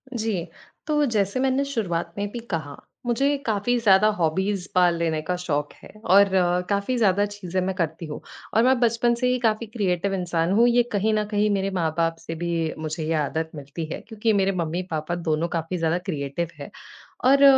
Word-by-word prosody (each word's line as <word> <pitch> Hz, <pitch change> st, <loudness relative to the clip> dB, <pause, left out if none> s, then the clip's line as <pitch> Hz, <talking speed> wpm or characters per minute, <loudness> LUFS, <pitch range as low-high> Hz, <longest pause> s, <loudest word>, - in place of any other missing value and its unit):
जी। 210 Hz, -6 st, -2 dB, 0.4 s
तो 295 Hz, -1 st, +2 dB
जैसे 210 Hz, -1 st, 0 dB
मैंने 265 Hz, +1 st, +2 dB
शुरुआत 175 Hz, -10 st, -2 dB
में 205 Hz, 0 st, -1 dB
भी 240 Hz, -, -5 dB
कहा, 155 Hz, -4 st, -3 dB, 0.3 s
मुझे 275 Hz, +4 st, +2 dB
काफ़ी 220 Hz, +3 st, +1 dB
ज़्यादा 205 Hz, -1 st, +5 dB
हॉबीज़ 190 Hz, +4 st, 0 dB
पाल 175 Hz, -2 st, +4 dB
लेने 160 Hz, -2 st, 0 dB
का 180 Hz, +3 st, -2 dB
शौक 150 Hz, -5 st, -2 dB
है -, -, -13 dB, 0.2 s
और 195 Hz, +1 st, +5 dB
अ, 180 Hz, -1 st, +3 dB
काफ़ी 200 Hz, +5 st, 0 dB
ज़्यादा 205 Hz, -2 st, +3 dB
चीज़ें 190 Hz, -3 st, -4 dB
मैं 190 Hz, 0 st, -2 dB
करती 165 Hz, -2 st, -2 dB
हूँ। 150 Hz, -, -6 dB, 0.3 s
और 225 Hz, -, +4 dB
मैं 260 Hz, -1 st, +4 dB
बचपन 235 Hz, 0 st, +2 dB
से 250 Hz, +1 st, 0 dB
ही 250 Hz, 0 st, +2 dB
काफ़ी 225 Hz, -1 st, +1 dB
क्रिएटिव 195 Hz, -3 st, -1 dB
इंसान 175 Hz, -2 st, 0 dB
हूँ। 230 Hz, +4 st, +5 dB
ये 240 Hz, 0 st, +4 dB
कहीं 215 Hz, +1 st, +1 dB
न 215 Hz, 0 st, +2 dB
कहीं 210 Hz, 0 st, +2 dB
मेरे 195 Hz, -1 st, 0 dB
माँ-बाप 165 Hz, -2 st, 0 dB
से 165 Hz, -, -6 dB
भी, 165 Hz, -1 st, -1 dB
मुझे 155 Hz, 0 st, -4 dB
ये 160 Hz, +1 st, -1 dB
आदत 160 Hz, +1 st, -1 dB
मिलती 145 Hz, +3 st, -6 dB
है। -, -, -4 dB
क्योंकि 220 Hz, 0 st, 0 dB
मेरे 195 Hz, -1 st, +2 dB
मम्मी-पापा 165 Hz, 0 st, -3 dB
दोनों 165 Hz, -1 st, -1 dB
काफ़ी 165 Hz, +3 st, -3 dB
ज़्यादा 165 Hz, +1 st, +1 dB
क्रिएटिव 145 Hz, +2 st, -2 dB
हैं। 140 Hz, -, -7 dB, 0.6 s
और 275 Hz, +2 st, +6 dB
185 Hz, 190 wpm, -24 LUFS, 165-220 Hz, 0.6 s, और